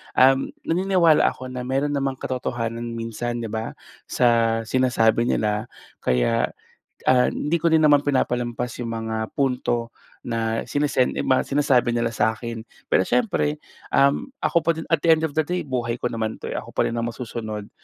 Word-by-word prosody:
um, 135 +1 +5 0.2
naniniwala 175 -2 +3
ako 130 0 -4
na 125 -1 -5
meron 135 +3 0
namang 135 -1 -1
katotohanan 120 -2 -3
minsan, 115 +1 -4
'di 110 - -5
ba? 110 +1 -4 0.3
Sa 115 -2 +2
sinasabi 120 -1 +2
nila, 105 0 0 0.3
kaya, 60 -1 +1 0.6
ah, 125 -1 +5
hindi 155 +4 -1
ko 170 +1 +1
rin 160 - +5
naman 145 -1 +5
pinapalampas 125 -3 -1
yung 115 -1 -4
mga 110 -1 -4
punto 125 -3 0 0.3
na 115 -1 -1
sinesen 145 -3 +1
mga 130 - +2
sinasabi 135 -4 +2
nila 115 -1 +1
sa 110 - +2
akin. 115 0 -7 0.2
Pero - - +3
siyempre, 155 -11 0 0.3
um, 140 - +3 0.2
ako - - -1
pa 170 - +3
din 160 - -6
at 165 - +5
the 170 - +2
end 160 - +4
of 160 - -2
the 155 - +3
day, 180 +2 -1
buhay 120 -3 -2
ko 125 - 0
naman 110 -2 -3
'to, - - -7
eh, - - -3
ako - - -7
pa - - +1
rin 115 - -4
ang 115 - -1
masusunod. 110 -4 -6
125 Hz, 175 wpm, -23 LUFS, 115-140 Hz, 0.6 s, um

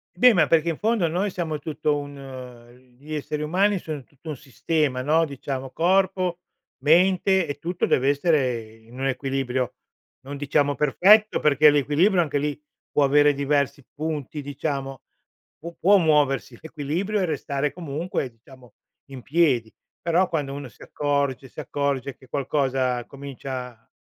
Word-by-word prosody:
Beh, 250 0 +7
ma 165 -5 +4
perché 165 +2 +2
in 165 - -2
fondo 215 -5 +1
noi 185 +5 -1
siamo 160 -4 -3
tutto 150 0 -1
un 130 -3 -10
gli 155 +2 -6
esseri 150 +1 -3
umani 185 +5 +2
sono 150 -5 -6
tutto 145 +4 -13
un 150 - -4
sistema, 145 -1 -1
no. 160 +4 +3
Diciamo 135 -2 -5
corpo, 185 0 +1 0.5
mente 185 +3 +4
e 145 0 -4
tutto 175 +3 -2
deve 135 +2 +2
essere 130 -8 0
in 115 +3 -15
un 135 - 0
equilibrio, 130 -1 -2 0.5
non 140 +2 -7
diciamo 145 0 +1
perfetto, 200 - +4
perché 150 0 +5
l'equilibrio, 155 +7 +3
anche 145 -3 -1
lì, 145 0 -2 0.3
può 145 - +3
avere 145 +1 +5
diversi 140 -1 0
punti 150 -2 -4
diciamo, 140 -2 -4 0.6
pu 170 +2 -9
può 200 +3 +6
muoversi 150 -6 +1
l'equilibrio 165 +7 -2
e - - +2
restare 145 -3 -2
comunque 160 -4 -3
diciamo 120 0 -18 0.4
in 130 -3 -9
piedi. 135 -8 +2 0.3
Però 175 +2 +2
quando 145 -4 -2
uno 140 -1 -6
si - - -16
accorge 140 -2 -1
si - - -11
accorge 140 -2 -2
che 130 - -19
qualcosa 130 -2 0
comincia 130 -4 -8
145 Hz, 145 wpm, -24 LUFS, 135-165 Hz, 0.6 s, Beh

